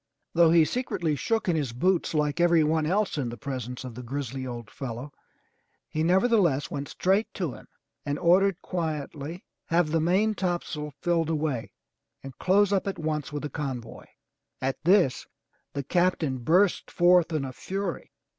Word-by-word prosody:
Though 170 -1 +6
he 165 -1 +6
secretly 195 - -1
shook 225 - -1
in 175 - +2
his 140 -7 -1
boots 175 +6 +1
like 150 +1 0
every 170 -2 +5
one 155 0 +1
else 195 -2 0
in 125 -4 -1
the 120 - -7
presence 125 -2 -5
of 130 -2 -7
the 125 - -8
grizzly 130 0 -4
old 120 -2 -7
fellow, 130 +1 -6 0.7
he 155 - -3
nevertheless 180 - +3
went 140 -1 -4
straight 195 +4 +1
to 170 -8 -2
him - - -13 0.4
and 145 0 -2
ordered 180 +2 +3
quietly: 160 -1 -4 0.2
"Have 165 -2 +2
the 165 - +2
maintopsail 175 -5 0
filled 165 -2 +1
away, 150 -7 -2 0.5
and 135 -2 -9
close 200 +2 +3
up 195 0 +1
at 195 - -2
once 155 -2 -2
with 145 0 -4
the 150 - -3
convoy." 130 -6 -5 0.5
At 135 +2 -3
this 175 -6 +3 0.5
the 140 - -3
Captain 165 -4 +1
burst 175 +10 +2
forth 175 -1 +4
in 155 -4 -1
a 130 - -6
fury. 190 +4 -4
160 Hz, 165 wpm, -27 LUFS, 140-180 Hz, 0.7 s, Though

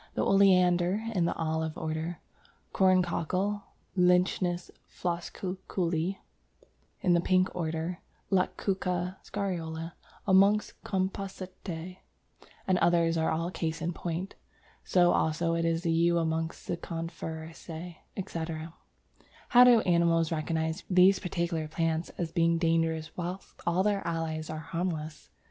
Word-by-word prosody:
The - - +1
Oleander, 185 0 +4
in 180 -4 +2
the 170 - 0
Olive 160 -1 -2
order, 160 +2 -3 0.5
Corncockle 185 +2 +2 0.3
(Lychnis 180 -1 +2 0.2
floscuculli), 180 0 -2 0.8
in 180 - +3
the 170 - +4
Pink 185 +1 +2
order, 165 +1 -2 0.3
Lactuca 185 -1 0
Scariola 170 -5 -3 0.3
amongst 200 +2 +3
Compositæ 185 -2 -4 0.7
and 185 -1 +2
others 170 -1 +3
are 160 -1 +1
all 165 +2 -1
cases 165 -2 -3
in 175 +1 -1
point. 175 +3 -4 0.5
So 175 -1 +4
also 165 +1 +1
is 165 0 0
the 165 - +1
Yew 170 +1 +3
amongst 160 0 -2
Coniferæ, 165 0 -6 0.2
etc. 165 -4 -4 0.8
How 245 0 +8
do 245 -3 +7
animals 170 -3 +3
recognize 160 0 -1
these 185 +1 +6
particular 170 -3 -2
plants 165 +1 -1
as 170 -2 -2
being 165 0 +3
dangerous 165 -1 0
whilst 180 +2 -6
all 175 +2 +3
their 205 -1 +1
allies 160 -1 -2
are 155 - -4
harmless? 165 -4 -3
170 Hz, 115 wpm, -29 LUFS, 165-185 Hz, 0.8 s, How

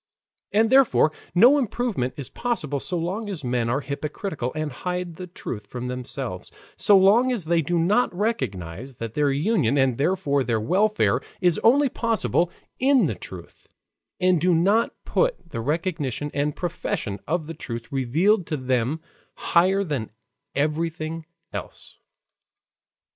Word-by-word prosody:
And 220 +2 +3
therefore 260 - +5 0.2
no 250 +10 +7
improvement 225 - -1
is 140 -4 -5
possible 155 - -2
so 180 +6 -2
long 190 +6 -3
as 175 -7 -5
men 120 -2 0
are 135 +4 0
hypocritical 140 0 -4
and 155 -1 -2
hide 180 +4 -4
the 185 - -7
truth 110 - -7
from 125 +2 -5
themselves, 125 -5 -5 0.2
so 205 - +6
long 215 +7 +5
as 225 -9 -2
they 165 +1 +2
do 170 +3 -1
not 200 +9 +2
recognize 130 - -3
that 115 -1 -6
their 145 0 +2
union 145 - +1
and 130 -3 +2
therefore 145 -3 +1
their 115 -3 0
welfare 200 - +2 0.2
is 175 -4 +2
only 275 +5 +5
possible 225 -8 0 0.3
in 265 0 +4
the - - 0
truth, - - -11 0.5
and 180 -3 +3
do 180 0 +3
not 200 +8 +3
put - - 0
the 115 - -3
recognition 150 -1 -2
and 145 +1 -1
profession 170 - -3
of 160 0 -1
the 165 - -6
truth 120 -7 -7
revealed 160 - +2
to 155 - -2
them 130 +3 0 0.3
higher 190 +3 +3
than 140 - -3 0.5
everything 155 +2 -2 0.3
else. - - -8
165 Hz, 145 wpm, -24 LUFS, 135-195 Hz, 0.5 s, no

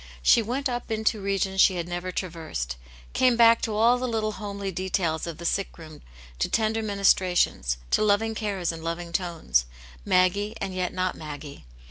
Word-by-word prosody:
She 230 - +6
went 255 +6 -2
up 245 -1 -4
into 220 -1 0
regions 195 -1 +1
she 190 - +5
had 170 -1 -3
nevef 175 +1 -4
traversed; 160 - -4 0.4
came 255 -2 +3
back 230 -1 +6
to 220 - -2
all 235 +3 +4
the 255 - -2
little 220 -2 -1
homely 200 -2 -5
details 175 -3 -1
of 165 -2 -6
the 170 - -8
sick 195 +3 -1
room, 155 -2 -12 0.4
to - - 0
tender 220 0 +1
ministrations, 185 - +2
to - - +3
loving 215 +1 +2
cares 200 -6 -2
and 165 -1 -9
loving 170 +1 -4
tones; 165 - 0 0.4
Maggie, 200 - +2
and 195 -3 -3
yet 180 -1 -1
not 185 0 -1
Maggie. 145 - -9
190 Hz, 175 wpm, -26 LUFS, 170-215 Hz, 0.4 s, She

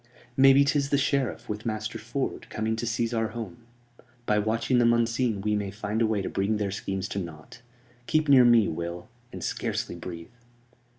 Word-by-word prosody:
"Maybe 135 +1 +6
'tis 140 -1 +1
the 140 - +3
Sheriff, 140 -2 0
with 105 0 -4
Master 110 -1 -3
Ford, 125 +4 -4
coming 110 +1 -1
to 115 +1 -3
seize 115 +1 -1
our 115 -1 +1
home. 110 -6 -7 0.7
By 105 -2 +2
watching 115 +4 +1
them 120 -1 +5
unseen 115 -2 +1
we 105 +1 0
may 100 -1 -2
find 105 +2 -3
a 115 - +4
way 105 -3 0
to - - -3
bring 100 +2 0
their 100 -2 -2
schemes 95 -1 -3
to 100 - -3
naught. 85 +3 -9 0.5
Keep 155 -1 +2
near 135 -3 +7
to 120 - +6
me, 115 -3 +5
Will; 85 +2 -5 0.2
and - - -7
scarcely - - -2
breathe." 85 -1 -8
110 Hz, 190 wpm, -27 LUFS, 100-120 Hz, 0.7 s, near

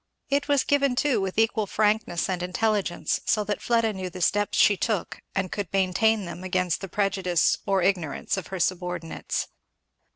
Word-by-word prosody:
It 285 +1 +1
was 285 -2 +3
given 280 -3 +2
too 260 -4 +2
with 190 0 -3
equal 225 -1 +2
frankness 210 -4 +1
and 185 -2 -2
intelligence, 190 0 0
so 215 - +1
that 205 0 -3
Fleda 230 -2 +1
knew 190 -1 -5
the 185 - -9
steps 205 +4 +1
she 205 - +6
took 210 -1 -2 0.2
and 190 -2 -1
could 200 -6 -4
maintain 195 +3 +2
them 175 +1 -7
against 180 -2 0
the 195 - -5
prejudice 190 -3 +1
or 195 -2 +2
the 185 - +6
ignorance 170 -7 -2
of 190 -3 -5
her 190 -1 -5
subordinates. 180 -2 -2
195 Hz, 175 wpm, -26 LUFS, 180-220 Hz, 0.2 s, she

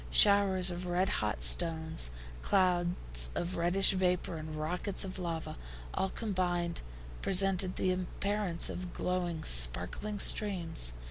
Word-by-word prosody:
Showers 195 -3 +5
of 175 +1 -6
red 180 +2 0
hot 105 -1 -2
stones, 160 - 0 0.3
clouds 175 - 0
of 175 +2 -3
reddish 175 +3 +5
vapor 180 -3 -1
and 155 0 -7
rockets 175 +6 -2
of 190 -1 -7
lava, 165 - -5 0.4
all 190 - -1
combined, 180 -6 -2 0.4
presented 190 -1 +3
the 185 - 0
appearance 185 0 -3
of 180 -1 -7
glowing 175 -3 -3
sparkling 60 - +2
streams. 175 - +1
180 Hz, 120 wpm, -31 LUFS, 165-190 Hz, 0.4 s, Showers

